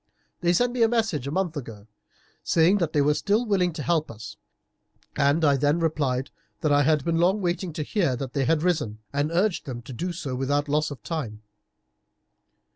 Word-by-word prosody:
They 175 -1 +2
sent 240 +8 +2
me 250 - -2
a 225 - +6
message 220 - 0
a - - -3
month 180 -1 -1
ago, 115 -7 -8 0.6
saying 175 +5 +3
that 170 -4 0
they 145 - +2
were 150 +1 +3
still 210 +9 +1
willing 190 -5 +1
to 150 - -5
help 160 -1 0
us, 110 -1 -9 0.8
and 145 +3 +2
I 140 -1 +4
then 145 +3 +2
replied 140 -6 -1 0.3
that 155 -3 +1
I 145 0 +5
had 150 -1 +2
been 165 -1 +1
long 185 +5 +3
waiting 180 -1 -2
to 155 -1 -3
hear 165 -6 0
that 130 0 -6
they 140 -2 0
had 155 +3 +1
risen, 155 -12 0 0.2
and 145 +2 0
urged 180 -1 0
them 120 -3 -6
to 130 - -9
do 175 +9 -3
so 160 -6 -5
without 145 +3 0
loss 150 +1 +1
of 135 -7 -9
time. 115 -11 -5
155 Hz, 200 wpm, -25 LUFS, 140-175 Hz, 0.8 s, a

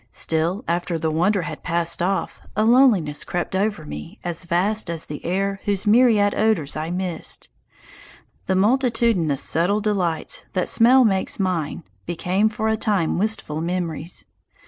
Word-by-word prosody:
Still, 165 - -1
after 175 0 -1
the 160 0 -1
wonder 180 +4 +1
had 150 - -6
passed 170 -1 -1
off, 190 +2 -1 0.2
a 215 +1 +2
loneliness 225 - +4
crept 175 +1 -3
over 200 -4 -1
me 75 - -8
as 175 0 -3
vast 185 +4 0
as 165 -1 -3
the 150 - -8
air 195 +2 -1
whose 200 0 0
myriad 215 -2 +4
odours 210 -10 +1
I 155 +1 -3
missed. 180 -2 -4 1.0
The 190 - +1
multitudinous 225 - +2
subtle 180 +6 +2
delights 190 -7 -1
that 185 -2 0
smell 250 +3 +5
makes 195 -2 0
mine 180 -6 -2 0.2
became 180 +5 +1
for 220 0 -3
a 220 0 +1
time 200 -7 0
wistful 200 -7 -1
memories. 170 -1 -4
185 Hz, 145 wpm, -22 LUFS, 165-215 Hz, 1.0 s, smell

